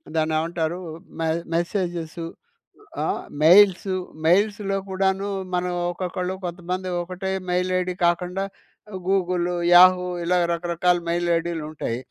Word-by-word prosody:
దాన్ని 160 Hz, 0 st, +1 dB
ఏమంటారు 165 Hz, +1 st, -2 dB, 0.4 s
మె 165 Hz, -, 0 dB, 0.3 s
మెసేజెసు 170 Hz, -2 st, -2 dB, 0.8 s
ఆహ్, -, -, -1 dB, 0.2 s
మెయిల్సూ 190 Hz, +2 st, +6 dB, 0.3 s
మెయిల్స్‌లో 200 Hz, +3 st, +2 dB
కూడాను 190 Hz, +1 st, 0 dB, 0.3 s
మనం 180 Hz, 0 st, 0 dB, 0.2 s
ఒక్కొక్కళ్ళు 180 Hz, +1 st, -3 dB
కొంతమంది 180 Hz, +1 st, -4 dB
ఒకటే 185 Hz, +2 st, -5 dB, 0.2 s
మెయిల్ 180 Hz, +1 st, +1 dB
ఐడీ 180 Hz, 0 st, -2 dB
కాకుండా 180 Hz, +2 st, 0 dB, 0.6 s
గూగులు, 180 Hz, -2 st, +1 dB, 0.2 s
యాహూ 180 Hz, 0 st, +7 dB, 0.2 s
ఇలా 180 Hz, +1 st, +2 dB, 0.2 s
రకరకాల 175 Hz, +1 st, +1 dB
మెయిల్ 175 Hz, +1 st, 0 dB
ఐడీలుంటాయి. 155 Hz, -7 st, -4 dB
180 Hz, 105 wpm, -23 LUFS, 170-185 Hz, 0.8 s, యాహూ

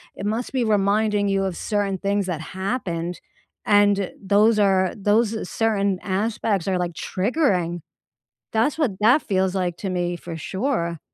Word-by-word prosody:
it -, -, -6 dB
must 220 Hz, +4 st, -2 dB
be 260 Hz, -2 st, 0 dB
reminding 210 Hz, -1 st, +2 dB
you 195 Hz, 0 st, +1 dB
of 190 Hz, -3 st, -2 dB
certain 205 Hz, -2 st, -1 dB
things 200 Hz, 0 st, 0 dB
that 175 Hz, -4 st, -3 dB
happened 180 Hz, -2 st, -3 dB, 0.5 s
and 205 Hz, -2 st, +3 dB
those 210 Hz, +3 st, +3 dB
are 190 Hz, -2 st, +3 dB
those 215 Hz, +1 st, +1 dB
certain 200 Hz, -4 st, 0 dB
aspects 200 Hz, -1 st, -1 dB
are, 185 Hz, -1 st, +1 dB
like, 175 Hz, -1 st, -2 dB
triggering. 185 Hz, -, 0 dB, 0.7 s
That's 235 Hz, +8 st, +1 dB
what 295 Hz, -9 st, +1 dB
that 245 Hz, +8 st, +5 dB
feels 190 Hz, -1 st, 0 dB
like, 180 Hz, -2 st, -1 dB
to 195 Hz, -, -4 dB
me, 175 Hz, -1 st, -1 dB
for 170 Hz, -1 st, -7 dB
sure. 180 Hz, -, -2 dB
200 Hz, 150 wpm, -23 LUFS, 185-215 Hz, 0.7 s, that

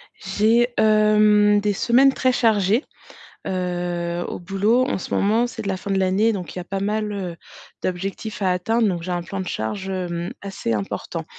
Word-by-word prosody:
J'ai, 220 Hz, +5 st, +2 dB
hem, 210 Hz, -1 st, +4 dB
des 205 Hz, 0 st, 0 dB
semaines 250 Hz, +6 st, +4 dB
très 260 Hz, -1 st, +2 dB
chargées, 220 Hz, -, +2 dB, 0.6 s
heu, 175 Hz, -1 st, -2 dB
au -, -, -5 dB
boulot 205 Hz, +7 st, +1 dB
en -, -, -1 dB
ce -, -, -6 dB
moment, 225 Hz, +4 st, +2 dB
c'est 235 Hz, -, -7 dB
de -, -, -5 dB
la 190 Hz, -1 st, -1 dB
fin 200 Hz, +2 st, -5 dB
de 195 Hz, -, +1 dB
l'année 195 Hz, +4 st, +2 dB
donc 185 Hz, -3 st, -6 dB
il -, -, -4 dB
y -, -, -3 dB
a -, -, -8 dB
pas 195 Hz, +2 st, -4 dB
mal, 210 Hz, +1 st, -1 dB
heu, 185 Hz, -4 st, -4 dB, 0.5 s
d'objectifs 195 Hz, +4 st, -4 dB
à 190 Hz, -2 st, +2 dB
atteindre 220 Hz, +6 st, +1 dB
donc 175 Hz, -4 st, -2 dB
j'ai 180 Hz, -, -4 dB
un 175 Hz, -1 st, -2 dB
plan 195 Hz, +3 st, -6 dB
de 185 Hz, -, -6 dB
charge, 185 Hz, -, -3 dB
hem, 175 Hz, -1 st, -3 dB
assez 195 Hz, -, -3 dB
important. 105 Hz, -2 st, -4 dB
195 Hz, 195 wpm, -22 LUFS, 180-215 Hz, 0.6 s, hem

